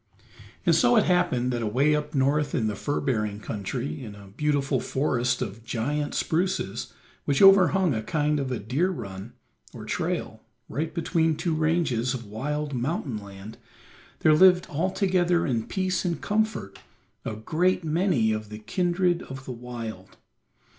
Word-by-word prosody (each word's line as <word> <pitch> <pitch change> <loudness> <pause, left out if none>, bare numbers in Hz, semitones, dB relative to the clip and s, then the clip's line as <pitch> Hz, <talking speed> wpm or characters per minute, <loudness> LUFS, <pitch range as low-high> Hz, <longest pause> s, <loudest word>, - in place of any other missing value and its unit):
And - - +5
so 245 -1 +4
it 215 - +5
happened 125 -9 +1
that 120 - -2
away 130 +8 +2
up 150 0 -3
north 140 +2 +1
in 115 - +1
the 105 -1 -1
fur 145 +8 -2
bearing 105 -6 -1
country, 100 - -4
in 105 -3 -8
a 100 -1 -13
beautiful 140 +3 0
forest 125 -3 0
of 105 +3 -7
giant 140 +6 -2
spruces, 165 - -1 0.3
which 140 -1 +1
overhung 195 -3 +6
a 110 - -1
kind 150 +4 0
of 135 -2 -3
a 125 - -1
deer 135 - 0
run, 100 - -7 0.4
or - - -8
trail, - - -3 0.3
right 155 +7 -3
between 165 -1 +1
two 165 +2 -1
ranges 155 -6 +1
of 120 -2 -7
wild 145 +8 -3
mountain 130 -1 -2
land, 100 +1 -11 0.6
there 155 - +5
lived 180 +2 +6
altogether 180 +1 +1
in 115 -6 -1
peace 185 -1 -1
and 170 -4 -1
comfort 210 - -1 0.4
a 110 - -4
great 170 +11 0
many 155 - +2
of 110 -1 -3
the 105 - -7
kindred 175 - 0
of 135 0 -9
the - - -5
wild. 115 -5 -8
140 Hz, 155 wpm, -26 LUFS, 115-170 Hz, 0.6 s, overhung